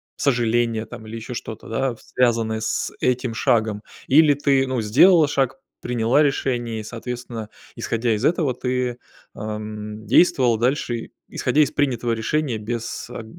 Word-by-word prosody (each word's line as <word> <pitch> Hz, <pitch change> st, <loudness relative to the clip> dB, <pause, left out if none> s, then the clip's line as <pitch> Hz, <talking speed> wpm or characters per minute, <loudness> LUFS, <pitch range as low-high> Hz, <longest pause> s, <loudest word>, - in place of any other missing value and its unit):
сожаления 120 Hz, -4 st, +1 dB
там 110 Hz, -, -10 dB
или 110 Hz, +1 st, -8 dB
еще 115 Hz, +2 st, -7 dB
что-то, 110 Hz, -1 st, -7 dB
да, 130 Hz, +3 st, 0 dB
в 115 Hz, -, -16 dB
связанное 115 Hz, -3 st, +1 dB
с 110 Hz, -, -1 dB
этим 125 Hz, -2 st, 0 dB
шагом? 110 Hz, -2 st, +1 dB, 0.2 s
Или 150 Hz, +2 st, +6 dB
ты, 140 Hz, -1 st, +2 dB
ну, 130 Hz, -2 st, -1 dB
сделала 150 Hz, -, +6 dB
шаг, 135 Hz, +2 st, 0 dB, 0.2 s
приняла 120 Hz, +4 st, +2 dB
решение 120 Hz, -5 st, -1 dB
и -, -, -6 dB
соответственно, 115 Hz, -1 st, -6 dB, 0.3 s
исходя 115 Hz, 0 st, 0 dB
из 105 Hz, +5 st, -2 dB
этого, 155 Hz, -6 st, +1 dB
ты, 125 Hz, -1 st, -2 dB, 0.4 s
ам, 105 Hz, 0 st, -6 dB
действовала 125 Hz, -, +4 dB
дальше, 125 Hz, +1 st, 0 dB
и 115 Hz, -, -7 dB, 0.2 s
исходя 155 Hz, -, +1 dB
из 145 Hz, -, +3 dB
принятого 120 Hz, -4 st, 0 dB
решения 125 Hz, +3 st, -1 dB
без 115 Hz, +2 st, -5 dB
аг 115 Hz, -, -7 dB
120 Hz, 150 wpm, -22 LUFS, 110-135 Hz, 0.4 s, Или